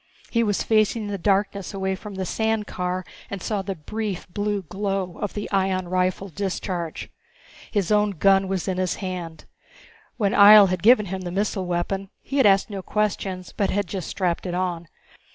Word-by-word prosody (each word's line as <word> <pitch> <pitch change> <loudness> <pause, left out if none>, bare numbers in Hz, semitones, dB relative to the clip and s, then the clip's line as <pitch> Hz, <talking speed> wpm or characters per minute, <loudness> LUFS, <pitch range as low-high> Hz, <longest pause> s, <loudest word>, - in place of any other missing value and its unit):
He 230 - +2
was 205 -3 +1
facing 215 0 +2
the 200 -1 -3
darkness 200 +1 0
away 190 0 -1
from 200 +1 -8
the 190 0 -3
sand 220 +2 0
car 180 -1 -3 0.2
and 200 - -5
saw 205 +2 -2
the 195 0 -4
brief, 200 +4 -4
blue 205 +1 -2
glow 195 0 -3
of 205 - -3
the 205 - -3
ion 190 -2 +1
rifle 185 +2 0
discharge. 180 -2 -4 0.6
His 205 -3 -1
own 210 0 +4
gun 195 +1 +3
was 190 -2 -2
in 185 -1 -1
his 185 -1 0
hand. 180 -4 -6 0.7
When 205 -4 +1
Ihjel 205 -2 +9
had 185 - -1
given 220 0 +6
him 190 0 -4
the 180 - -5
missile 195 0 -1
weapon 185 +3 -2
he 275 - -3
had 265 - +6
asked 195 +2 +3
no 195 -1 -4
questions, 190 -3 -2
but 200 - +1
had 205 +1 0
just 185 -1 -5
strapped 180 -1 -1
it 175 - -3
on. 175 -2 -2
195 Hz, 185 wpm, -24 LUFS, 185-205 Hz, 0.7 s, Ihjel